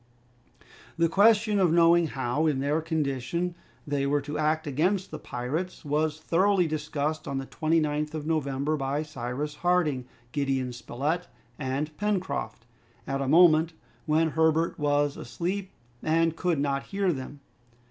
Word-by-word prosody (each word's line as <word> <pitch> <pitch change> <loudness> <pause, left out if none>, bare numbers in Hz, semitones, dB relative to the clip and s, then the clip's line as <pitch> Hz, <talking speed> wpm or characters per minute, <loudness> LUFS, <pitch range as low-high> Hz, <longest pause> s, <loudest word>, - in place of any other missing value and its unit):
The 165 0 +4
question 210 +3 +4
of 180 -4 +4
knowing 170 0 +5
how, 135 +3 -1
in 145 -4 +1
their 145 +4 +1
condition, 160 +2 -1 0.3
they 140 -2 0
were 145 +1 +2
to 145 +2 -6
act 155 +1 +1
against 180 +7 0
the - - -6
pirates, 150 +10 -4
was 150 +1 0
thoroughly 185 +3 +2
discussed 155 0 -2
on 140 - -2
the 135 - -3
29th 155 0 0
of 150 -1 -4
November 150 -2 0
by 140 +1 -1
Cyrus 145 +1 -4
Harding, 170 -8 +1 0.3
Gideon 135 -3 -1
Spilett, 145 +8 -3 0.3
and 145 +3 -2
Pencroft, 205 -3 -2 0.4
at 135 0 -2
a 135 - -1
moment 160 +1 +5 0.3
when 160 +1 +2
Herbert 160 +1 +2
was 145 -1 +1
asleep 185 +3 -3 0.3
and 165 +1 +2
could 175 -2 0
not 140 -1 0
hear 195 -3 0
them. 140 +1 -7
155 Hz, 140 wpm, -27 LUFS, 140-170 Hz, 0.4 s, knowing